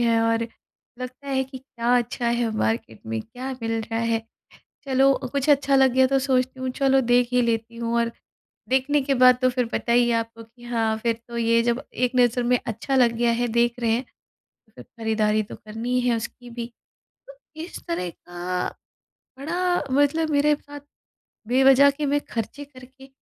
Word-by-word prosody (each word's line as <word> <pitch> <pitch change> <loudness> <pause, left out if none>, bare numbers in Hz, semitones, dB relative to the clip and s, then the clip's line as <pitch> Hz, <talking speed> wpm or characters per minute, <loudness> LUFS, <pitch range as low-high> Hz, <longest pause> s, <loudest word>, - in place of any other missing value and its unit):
हैं 230 -1 +3
और 230 0 +1 0.6
लगता 255 +3 -8
है 265 -1 +1
कि 265 0 -10
क्या 245 -1 0
अच्छा 240 0 -3
है 235 -1 0
मार्केट 220 - -2
में, 110 0 -2
क्या 255 +3 -7
मिल 225 - -1
रहा 225 +1 -3
है। 230 -1 0 0.6
चलो 270 0 +4 0.2
कुछ 280 +1 -1
अच्छा 280 -1 +4
लग 265 -2 +5
गया 260 0 +4
तो 270 +1 +2
सोचती 260 -1 0
हूँ, 260 - -2
चलो 270 0 +2
देख 245 -1 +3
ही 250 0 +3
लेती 230 0 -1
हूँ, 235 0 -2
और 235 0 0 0.6
देखने 265 +3 +2
के 275 0 0
बाद 255 -1 +6
तो 255 - +5
फिर 250 -1 -1
पता 235 - -1
ही 240 0 +4
है - - +2
आपको 230 0 -4
कि 240 +2 -19
हाँ, 225 -2 0
फिर 230 +1 0
तो 235 - -7
ये 230 0 +3
जब 240 +1 0
एक 250 0 0
नज़र 245 0 +3
में 250 0 +3
अच्छा 230 +5 -2
लग 240 -2 +4
गया 240 0 +2
है, 240 +1 0
देख 235 +1 +2
रहे 230 -1 +1
हैं, 245 +3 0 0.7
फ़िर - - -11
खरीदारी 215 -2 0
तो - - -10
करनी 230 +4 -3
है 245 -1 +2
उसकी 245 +2 -8
भी। 235 0 -5 0.6
तो - - -13 0.3
इस 345 - -8
तरह 175 +1 -2
का 175 +1 -4 0.7
बड़ा 355 +5 0
मतलब 290 +3 +2
मेरे 295 +1 +3
साथ 290 0 -11 0.7
बेवजह 270 +2 +6
के 290 +1 -3
मैं 290 +1 +1
खर्चे 235 +6 -4
करके 265 -1 -16
245 Hz, 190 wpm, -24 LUFS, 230-270 Hz, 0.7 s, बाद